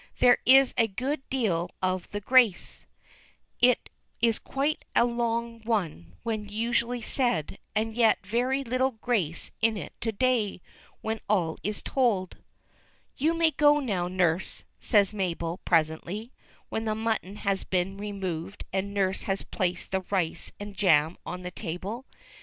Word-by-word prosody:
There 245 Hz, -1 st, +6 dB
is 270 Hz, +1 st, +7 dB
a 225 Hz, -, +5 dB
good 260 Hz, +8 st, -2 dB
deal 185 Hz, -10 st, 0 dB
of 185 Hz, -1 st, -1 dB
the 205 Hz, -, -4 dB
grace; 235 Hz, -4 st, +3 dB, 0.7 s
it 250 Hz, 0 st, +4 dB, 0.3 s
is 230 Hz, -1 st, +2 dB
quite 285 Hz, +3 st, -1 dB
a -, -, +6 dB
long 235 Hz, -1 st, -1 dB
one 165 Hz, -, -2 dB
when 215 Hz, -2 st, -3 dB
usually 235 Hz, +2 st, 0 dB
said, 210 Hz, -, 0 dB, 0.2 s
and 220 Hz, +1 st, 0 dB
yet 225 Hz, -3 st, +3 dB
very 250 Hz, +6 st, 0 dB
little 255 Hz, +1 st, +1 dB
grace 215 Hz, -8 st, -1 dB
in 225 Hz, -1 st, +3 dB
it 170 Hz, -, -7 dB
to 225 Hz, -, 0 dB
day, 225 Hz, -3 st, +1 dB, 0.4 s
when 220 Hz, 0 st, -2 dB
all 175 Hz, -6 st, +1 dB
is 210 Hz, 0 st, -3 dB
told. 220 Hz, -9 st, +1 dB, 0.8 s
"You 320 Hz, +5 st, +2 dB
may 330 Hz, -1 st, +3 dB
go 295 Hz, 0 st, +5 dB
now, 195 Hz, -10 st, -1 dB
nurse," 180 Hz, -1 st, 0 dB, 0.2 s
says 205 Hz, -3 st, +3 dB
Mabel, 175 Hz, -3 st, -2 dB
presently, 170 Hz, +7 st, 0 dB, 0.4 s
when 220 Hz, -, -2 dB
the 215 Hz, -1 st, 0 dB
mutton 220 Hz, -3 st, -2 dB
had 200 Hz, -2 st, -2 dB
been 190 Hz, +1 st, 0 dB
removed 195 Hz, -3 st, -4 dB
and 200 Hz, +1 st, -2 dB
nurse 190 Hz, -1 st, +1 dB
had 195 Hz, 0 st, -2 dB
placed 180 Hz, -2 st, -1 dB
the 190 Hz, 0 st, +1 dB
rice 180 Hz, -5 st, 0 dB
and 205 Hz, 0 st, -7 dB
jam 160 Hz, -4 st, +4 dB
on 180 Hz, 0 st, -5 dB
the 180 Hz, -, -5 dB
table. 200 Hz, -, -5 dB
"Mr. -, -, -23 dB
210 Hz, 150 wpm, -28 LUFS, 185-240 Hz, 0.8 s, is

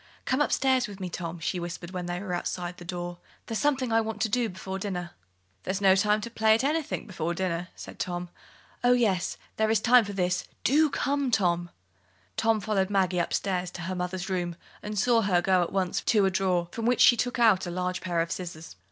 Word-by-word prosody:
"Come 260 Hz, +3 st, +1 dB
upstairs 260 Hz, -4 st, +2 dB
with 200 Hz, -1 st, -10 dB
me, 185 Hz, -2 st, -5 dB
Tom," 170 Hz, -1 st, -5 dB
she 175 Hz, +2 st, -2 dB
whispered, 175 Hz, +1 st, -6 dB
when 180 Hz, -2 st, -4 dB
they 175 Hz, 0 st, -3 dB
were 190 Hz, -2 st, -4 dB
outside 175 Hz, 0 st, -3 dB
the -, -, -10 dB
door. 175 Hz, 0 st, -5 dB, 0.3 s
"There's 225 Hz, -2 st, -3 dB
something 270 Hz, -4 st, +1 dB
I 225 Hz, 0 st, +4 dB
want 220 Hz, -1 st, -4 dB
to 220 Hz, -, 0 dB
do 235 Hz, +1 st, +1 dB
before 190 Hz, +1 st, -6 dB
dinner." 180 Hz, -3 st, -4 dB, 0.5 s
"There's 190 Hz, +1 st, -2 dB
no 190 Hz, -1 st, +5 dB
time 210 Hz, +2 st, +2 dB
to 235 Hz, +2 st, -6 dB
play 220 Hz, -1 st, +4 dB
at 230 Hz, -, 0 dB
anything 305 Hz, +2 st, -1 dB
before 175 Hz, -4 st, -3 dB
dinner," 180 Hz, -1 st, -2 dB
said -, -, -10 dB
Tom. 175 Hz, -1 st, -3 dB, 0.5 s
"Oh, 245 Hz, 0 st, +6 dB
yes, 205 Hz, -7 st, +1 dB, 0.2 s
there 220 Hz, 0 st, +2 dB
is 220 Hz, -1 st, +3 dB
time 245 Hz, +2 st, +6 dB
for 205 Hz, -1 st, -6 dB
this 180 Hz, -1 st, 0 dB, 0.2 s
do 305 Hz, +3 st, +4 dB
come, 280 Hz, -1 st, 0 dB
Tom." 175 Hz, -6 st, +1 dB, 0.7 s
Tom 225 Hz, -1 st, +2 dB
followed 195 Hz, -3 st, 0 dB
Maggie 185 Hz, -3 st, +1 dB
upstairs 180 Hz, +1 st, -1 dB
into 175 Hz, -1 st, -8 dB
her 185 Hz, +2 st, -3 dB
mother's 180 Hz, 0 st, -3 dB
room, 175 Hz, -2 st, -2 dB, 0.3 s
and 210 Hz, 0 st, -5 dB
saw 230 Hz, +3 st, +4 dB
her 190 Hz, -4 st, +2 dB
go 185 Hz, +1 st, +3 dB
at 175 Hz, -, -1 dB
once 190 Hz, -2 st, 0 dB
to 210 Hz, -4 st, +3 dB
a 190 Hz, -, +2 dB
drawer 180 Hz, -2 st, +1 dB
from 225 Hz, +3 st, -4 dB
which 245 Hz, -, +3 dB
she 240 Hz, -, +8 dB
took 245 Hz, +1 st, -1 dB
out 215 Hz, -6 st, +4 dB
a -, -, -3 dB
large 180 Hz, +1 st, -2 dB
pair 175 Hz, -2 st, 0 dB
of 165 Hz, +1 st, -3 dB
scissors. 170 Hz, -, -6 dB
190 Hz, 220 wpm, -27 LUFS, 180-225 Hz, 0.7 s, she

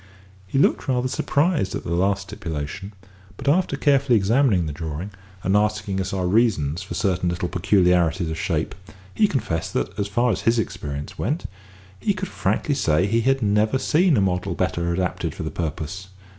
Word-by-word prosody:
He 115 Hz, -, -2 dB
looked 140 Hz, -, +2 dB
rather 130 Hz, -1 st, +1 dB
surprised 145 Hz, -, 0 dB
at -, -, -4 dB
the 85 Hz, -, -3 dB
last 95 Hz, +3 st, +1 dB
stipulation; 85 Hz, +2 st, -6 dB, 0.5 s
but -, -, -8 dB
after 175 Hz, +6 st, +2 dB
carefully 140 Hz, -4 st, +3 dB
examining 105 Hz, -2 st, +3 dB
the 75 Hz, -, -4 dB
drawing, 80 Hz, +5 st, -5 dB, 0.3 s
and 95 Hz, +2 st, +2 dB
asking 105 Hz, -2 st, +1 dB
us 95 Hz, -, -3 dB
our 95 Hz, -2 st, -1 dB
reasons 90 Hz, -6 st, +2 dB
for 95 Hz, -3 st, -6 dB
certain 90 Hz, -1 st, 0 dB
little 90 Hz, 0 st, -2 dB
peculiarities 90 Hz, -2 st, +2 dB
of 80 Hz, -, -4 dB
shape, 80 Hz, -1 st, -1 dB, 0.4 s
he 215 Hz, -, +4 dB
confessed 105 Hz, -, -2 dB
that, -, -, 0 dB
as 100 Hz, -, 0 dB
far 120 Hz, +4 st, +1 dB
as -, -, -2 dB
his 115 Hz, +1 st, +2 dB
experience 75 Hz, -4 st, -4 dB
went, 155 Hz, +5 st, -1 dB, 0.5 s
he 205 Hz, -, 0 dB
could 190 Hz, 0 st, -4 dB
frankly 145 Hz, -, 0 dB
say 85 Hz, -, +2 dB
he 115 Hz, +3 st, +1 dB
had 135 Hz, +1 st, +2 dB
never 105 Hz, +4 st, +2 dB
seen 155 Hz, +3 st, +3 dB
a -, -, +3 dB
model 90 Hz, -2 st, 0 dB
better 85 Hz, 0 st, -1 dB
adapted 90 Hz, +1 st, -2 dB
for -, -, -5 dB
the -, -, -4 dB
purpose. 80 Hz, +3 st, -4 dB
95 Hz, 180 wpm, -23 LUFS, 85-120 Hz, 0.5 s, he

